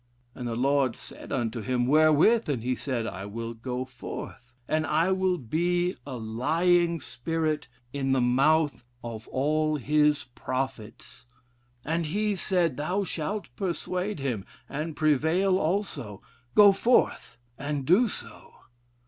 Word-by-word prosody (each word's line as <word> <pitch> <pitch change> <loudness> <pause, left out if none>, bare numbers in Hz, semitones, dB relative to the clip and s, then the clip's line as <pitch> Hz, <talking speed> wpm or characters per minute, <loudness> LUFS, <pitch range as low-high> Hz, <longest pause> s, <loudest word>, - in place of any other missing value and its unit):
And 125 - -6
the 115 - -2
Lord 135 0 +2
said 110 - -11
unto 120 -2 -1
him 120 +3 0
wherewith? 155 - +4
And 125 -6 -1
he 130 +1 0
said, 125 -2 -2
I 95 -2 -5
will 115 +2 -5
go 125 +2 -4
forth, 125 -1 -8 0.2
and 155 0 0
I 165 +4 +2
will 185 -1 +1
be 175 +7 0
a 130 -3 -5
lying 165 +10 +1
spirit 155 +3 -2 0.3
in 135 -1 -1
the 135 - +3
mouth 140 +4 +2 0.2
of 115 -2 -7
all 155 +3 +1
his 150 +1 +2
prophets. 130 -3 -5 0.6
And 165 +1 -1
he 205 +5 0
said, 175 -6 0
thou 180 +7 -1
shalt 175 - -4
persuade 185 +1 -2
him, 125 -8 -2 0.2
and 155 +2 -4
prevail 160 +6 +2
also. 155 - -2 0.3
Go 205 -1 +9
forth 230 +5 +1 0.2
and 140 -1 -3
do 195 - +5
so. - - -9
150 Hz, 135 wpm, -27 LUFS, 125-175 Hz, 0.6 s, Go